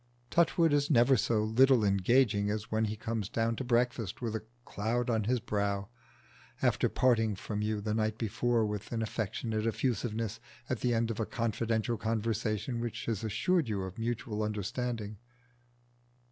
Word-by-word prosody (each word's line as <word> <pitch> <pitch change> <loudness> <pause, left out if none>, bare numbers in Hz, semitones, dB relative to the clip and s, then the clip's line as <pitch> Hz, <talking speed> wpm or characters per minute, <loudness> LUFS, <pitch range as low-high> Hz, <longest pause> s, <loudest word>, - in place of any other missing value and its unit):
Touchwood 165 -2 +3
is 145 0 +2
never 130 -1 +5
so 110 -1 +1
little 120 +1 +4
engaging 100 +1 +3
as 105 +1 -3
when 110 0 +2
he 110 0 -2
comes 110 -2 -3
down 115 -1 0
to - - -2
breakfast 120 -4 0
with 115 -3 -3
a 110 - -4 0.2
cloud 120 +4 -1
on 110 -2 +1
his 125 +3 +1
brow, 100 -3 -1 0.7
after - - +2
parting 115 -4 +2
from 105 +2 -4
you 105 0 -1
the 105 +1 -2
night 110 0 0
before 115 +1 +1
with 105 -1 -4
an 115 -1 -1
affectionate 110 +1 -2
effusiveness 115 -2 -1 0.3
at - - -2
the 120 -1 +1
end 115 0 +1
of 115 - -5
a 110 - +1
confidential 115 0 -1
conversation 110 +1 -1
which 120 -1 -4
has 115 -3 -2
assured 155 - +1
you 100 -3 -1
of 95 +3 -7
mutual 115 -2 -2
understanding. 105 +1 -3
115 Hz, 160 wpm, -31 LUFS, 105-120 Hz, 0.7 s, never